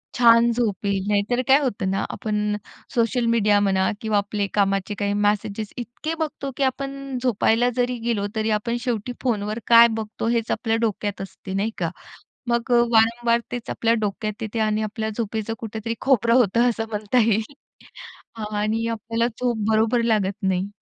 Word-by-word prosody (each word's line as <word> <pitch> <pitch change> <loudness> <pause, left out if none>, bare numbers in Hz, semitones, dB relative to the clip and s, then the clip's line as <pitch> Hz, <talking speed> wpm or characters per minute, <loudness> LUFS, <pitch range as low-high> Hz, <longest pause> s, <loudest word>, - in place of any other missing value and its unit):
छान 235 -1 +6
झोप 215 -5 -1
येईल. 195 -1 0
नाहीतर 210 +4 +1
काय 270 - +7
होतं 215 -8 -1
ना, 195 +1 0
आपण 210 -1 -2 0.4
सोशल 235 +1 +1
मीडिया 210 -3 +3
म्हणा 190 -2 +2
किंवा 220 -2 +1
आपले 205 0 -1
कामाचे 195 0 +1
काही 200 0 -1
मॅसेजेस 205 0 -1
इतके 245 +6 -5
बघतो, 290 -3 -3
की 280 - +1
आपण 275 0 -3
झोपायला 240 0 +2
जरी 245 0 0
गेलो, 215 -4 0
तरी 220 0 0
आपण 235 +3 -2
शेवटी 240 -1 -2
फोनवर 215 -3 -1
काय 235 0 +8
बघतो, 220 +1 -4
हेच 230 -1 0
आपल्या 225 -1 0
डोक्यात 205 -3 -2
असते, 190 0 -8
नाही 205 +3 0
का? 170 -2 -1 0.6
मग 235 0 0
अ, 240 -1 +6
वारंवार 235 +1 +3
तेच 245 -1 -5
आपल्या 230 0 +1
डोक्यात 210 0 -3
येते 220 +1 -3
आणि 215 0 +1
आपल्या 220 +1 -3
झोपेचं 220 -1 -2
कुठेतरी 225 0 -4
खोबरं 235 -4 +3
होतं, 240 0 +4
असं 225 -1 -3
म्हणता 210 +3 0
येईल. 220 +4 0 0.8
हां, 215 -1 -5
आणि 220 +2 0
आपल्याला 230 +1 -1
झोप 245 0 -2
बरोबर 225 +2 +2
लागत 210 -4 +1
नाही. 190 0 0
225 Hz, 165 wpm, -23 LUFS, 205-235 Hz, 0.8 s, काय